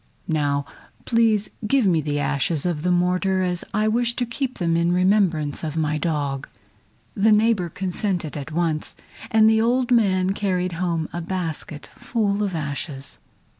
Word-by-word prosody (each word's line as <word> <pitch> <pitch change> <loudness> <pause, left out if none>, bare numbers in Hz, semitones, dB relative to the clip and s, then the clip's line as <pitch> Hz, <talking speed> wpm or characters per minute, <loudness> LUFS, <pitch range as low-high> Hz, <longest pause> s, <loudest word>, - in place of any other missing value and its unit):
Now 145 -3 0 0.4
please 225 -3 +2 0.2
give 270 0 +3
me 170 -5 +3
the 145 0 -2
ashes 145 +2 0
of 170 -4 -1
the 180 - 0
mortar, 180 +2 +1
as 180 -1 -1
I 215 +1 +1
wish 235 +2 +1
to 245 - 0
keep 255 +2 -3
them 170 -2 +1
in 170 +1 +2
remembrance 180 -6 +2
of 155 0 -3
my 155 -1 0
dog." 145 -3 -2 0.7
The 220 -1 +3
neighbor 210 -4 +3
consented 180 -2 -2
at 145 +2 -6
once, 160 -2 -1 0.3
and 220 -1 +5
the 220 0 +4
old 245 +2 +1
man 190 -5 +3
carried 185 -3 -1
home 165 -2 -1
a 175 - -3
basket 165 -4 -4
full 210 -3 -1
of 200 -4 -1
ashes. 140 -2 -4
180 Hz, 160 wpm, -23 LUFS, 155-210 Hz, 0.7 s, and